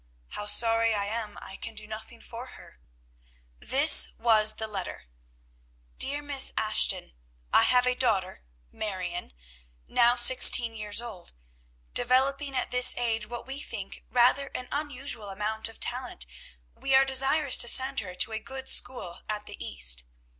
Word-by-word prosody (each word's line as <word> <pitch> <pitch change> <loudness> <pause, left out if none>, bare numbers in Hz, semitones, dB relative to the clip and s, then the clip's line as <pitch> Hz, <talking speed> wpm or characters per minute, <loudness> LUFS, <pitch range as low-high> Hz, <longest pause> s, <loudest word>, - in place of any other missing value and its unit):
"How 205 - -7
sorry 225 +1 +2
I 200 -1 -3
am, 215 0 -6
I 190 - -11
can 225 - -9
do 215 -1 -7
nothing 220 +2 -11
for 240 +2 -10
her!" - - -18 0.8
This 280 +5 +8
was 215 -2 +3
the 220 - -5
letter: 210 -2 -8 1.0
DEAR 285 +2 -1
MISS 285 -2 -2
ASHTON, 205 - 0 0.4
I - - +6
have 250 0 +2
a 250 - +1
daughter 200 -7 -2 0.3
Marion, 185 - -7 0.6
now 240 - +2
sixteen 240 -1 +6
years 210 0 -4
old. 220 - -11 0.6
Developing 270 +3 -1
at 255 - -4
this 250 0 +3
age 225 -3 -3
what 240 +1 -9
we 270 +2 -7
think 205 -8 -9
rather 250 +3 +1
an 250 - -7
unusual 275 -7 -5
amount 215 +3 -4
of 225 - -15
talent, - - -5 0.5
we 270 - -2
are 270 0 +4
desirous 270 +1 +2
to 240 - -1
send 260 +2 +4
her 185 -4 -8
to 225 - +1
a 220 - -5
good 265 +3 -9
school 215 -9 -3
at 210 -1 -5
the 205 - -9
East. - - -4
230 Hz, 155 wpm, -26 LUFS, 210-260 Hz, 1.0 s, This